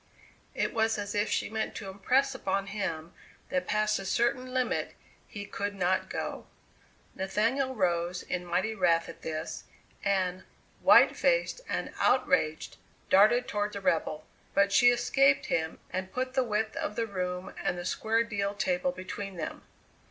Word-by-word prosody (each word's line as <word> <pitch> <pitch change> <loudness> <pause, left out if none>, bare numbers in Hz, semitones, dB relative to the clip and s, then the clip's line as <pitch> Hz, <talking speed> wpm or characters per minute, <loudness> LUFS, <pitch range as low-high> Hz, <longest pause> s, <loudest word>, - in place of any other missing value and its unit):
It - - -1
was 225 -1 +1
as 205 -1 -4
if 205 +1 +1
she - - 0
meant 220 0 -3
to 205 - -6
impress 255 +8 +1
upon 195 -6 -1
him 170 -5 -3 0.4
that 180 0 -1
past 215 0 +1
a - - -6
certain 250 +5 0
limit 255 -1 -1 0.3
he 205 -1 -7
could 205 0 -4
not 185 0 0
go. - - -4 0.7
Nathaniel 230 +8 0
rose 175 -2 0
in 180 0 -3
mighty 185 +5 0
wrath 170 -5 +2
at - - -10
this, 160 0 -5 0.4
and, 185 -2 0 0.4
white - - +7
faced - - +1
and - - -2
outraged, 160 -11 +1 0.3
darted 215 +6 +5
toward 205 0 -1
the 200 - -4
rebel, 155 -4 0 0.3
but 200 0 +4
she 245 +4 +6
escaped 270 +3 +3
him 160 -1 -1
and 185 +1 -3
put 255 0 -2
the 260 -1 +2
width 220 -1 -1
of 210 - -3
the 230 - 0
room 180 -3 -4
and 180 - 0
the 175 - -5
square 225 +4 +1
deal 200 -3 -2
table 180 -3 0
between 185 +2 -6
them. 155 - -5
200 Hz, 160 wpm, -29 LUFS, 180-230 Hz, 0.7 s, white